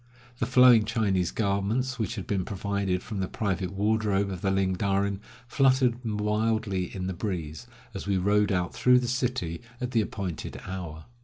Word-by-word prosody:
The - - 0
flowing 125 -4 +7
Chinese 100 -5 +1
garments 110 +5 -1
which 110 +1 -2
had 100 -5 -5
been 95 -1 -1
provided 100 -1 -2
from 105 - -5
the 95 - -1
private 95 -4 -2
wardrobe 100 -1 +1
of 90 -2 -6
the 95 - +1
Ling 95 -1 +1
Darin 100 +1 0 0.3
fluttered 130 -2 +3
wildly 105 -2 0
in 90 0 -6
the 95 - -2
breeze, 85 +1 -4 0.3
as 100 - -6
we 100 -1 +2
rode 100 +2 +2
out 90 -2 0
through 125 0 +5
the 125 -1 0
city 125 -9 -2 0.2
at 125 -1 -3
the 115 -3 +3
appointed 100 -5 -5
hour. 85 -4 -6
100 Hz, 170 wpm, -27 LUFS, 95-115 Hz, 0.3 s, flowing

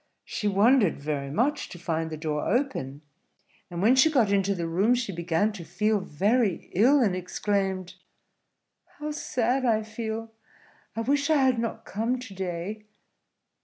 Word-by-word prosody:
She 210 - -3
wondered 205 0 +4
very 140 -1 -3
much 245 - 0
to - - -9
find 165 -2 -2
the 155 - -5
door 150 -1 -2
open; 200 - -1 0.7
and 175 +1 -4
when 240 +5 +5
she 265 +4 +6
got 245 -9 +2
into 200 0 +2
the 170 -2 -3
room, 195 +9 +2
she 240 -4 -2
began 170 +4 0
to 200 -5 -8
feel 205 +6 0
very 200 +4 0
ill, 260 +9 +5
and 195 -5 +1
exclaimed, 190 0 -2 1.0
"How 300 0 -4
sad 255 -3 -1
I 220 -3 +2
feel! 220 0 -5 0.6
I 225 - -1
wish 285 +4 +1
I 315 - +5
had 260 -3 +3
not 225 -1 -4
come 230 +5 -1
to 250 -5 -9
day." 190 +3 -5
210 Hz, 160 wpm, -27 LUFS, 175-240 Hz, 1.0 s, she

